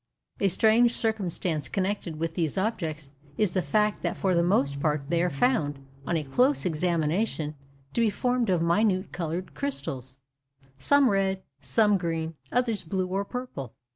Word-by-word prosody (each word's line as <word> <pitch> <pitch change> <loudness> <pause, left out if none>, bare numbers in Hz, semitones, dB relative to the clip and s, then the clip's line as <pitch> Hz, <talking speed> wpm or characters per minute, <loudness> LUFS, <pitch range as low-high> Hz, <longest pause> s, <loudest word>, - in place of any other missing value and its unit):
A 200 - +3
strange 225 +5 +4
circumstance 185 -8 -1
connected 190 -4 -2
with 165 +1 -2
these 165 0 -1
objects 160 -8 -2 0.3
is 210 -4 +2
the 185 - +1
fact 210 +7 +1
that - - -2
for 190 -2 +1
the 170 - +3
most 140 -6 +2
part 150 -1 0
they 170 0 +2
are 180 - +2
found, 145 - +1 0.3
on 170 - +1
a 155 - -2
close 250 - +2
examination, 165 0 0 0.4
to 235 - +1
be 225 - +4
formed 245 +2 0
of 175 -3 +2
minute 185 +2 +2
coloured 175 +1 -4
crystals—some 135 - -2
red, 195 -2 +1 0.2
some 200 - +3
green, 165 -2 -2 0.2
others 235 -4 +1
blue 185 +2 -2
or 195 +2 0
purple. 200 - -6
180 Hz, 155 wpm, -27 LUFS, 155-210 Hz, 0.4 s, strange